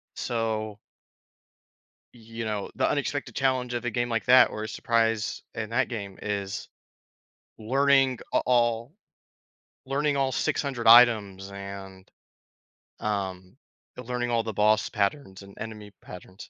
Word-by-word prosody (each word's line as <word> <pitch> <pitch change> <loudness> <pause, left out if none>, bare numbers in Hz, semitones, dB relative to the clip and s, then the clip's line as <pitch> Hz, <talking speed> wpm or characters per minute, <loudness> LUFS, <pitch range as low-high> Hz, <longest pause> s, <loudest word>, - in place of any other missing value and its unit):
so 110 -2 -3 1.3
you 115 -1 -8
know, 105 -2 -3
the - - +1
unexpected - - -2
challenge 130 -2 0
of 120 - -3
a - - +1
game 120 +2 -1
like 115 -1 -1
that 130 +1 +7
or 105 - -5
a - - -4
surprise 115 -2 0
in 110 0 -4
that 125 +3 +1
game, 100 -5 -6
is 100 -1 -4 0.9
learning 135 +2 +2
a - - +4
all 120 +1 +1 0.9
learning 140 +2 0
all 135 -1 +1
600 130 -2 -1
items 110 -5 +6
and, 100 -1 -9 0.9
um, 95 -2 -4 0.4
learning 125 0 -3
all 115 -1 +1
the 110 - -4
boss 105 +1 +2
patterns 100 -1 -2
and 100 0 -14
enemy 105 -2 -8
patterns. 90 +1 -12
115 Hz, 125 wpm, -26 LUFS, 100-125 Hz, 1.3 s, that